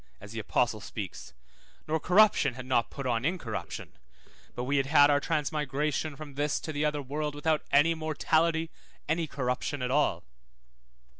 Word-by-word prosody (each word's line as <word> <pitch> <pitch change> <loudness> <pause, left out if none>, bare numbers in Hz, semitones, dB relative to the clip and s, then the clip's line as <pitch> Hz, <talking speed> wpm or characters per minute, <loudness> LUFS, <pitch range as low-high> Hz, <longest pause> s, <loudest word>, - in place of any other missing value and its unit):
(as 105 +1 -11
the 115 - -5
apostle 110 0 0
speaks), 100 - -7 0.6
nor 160 +1 0
corruption 180 - +4
had 130 -1 -7
not 125 -3 +1
put 140 - -7
on 120 -2 0
incorruption, 150 -8 -4 0.6
but 120 - -3
we 140 +3 0
had 135 0 +1
had 145 0 +6
our 145 - +4
transmigration 150 -1 -1
from 145 -1 -9
this 145 +1 0
to 155 - -6
the 145 +1 -1
other 150 -1 0
world 150 +2 -3
without 155 +1 +1
any 145 +4 +5
mortality, 160 +1 +1 0.4
any 160 +1 0
corruption 130 +1 -2
at 125 - -1
all. 140 - +2
145 Hz, 160 wpm, -29 LUFS, 130-155 Hz, 0.6 s, had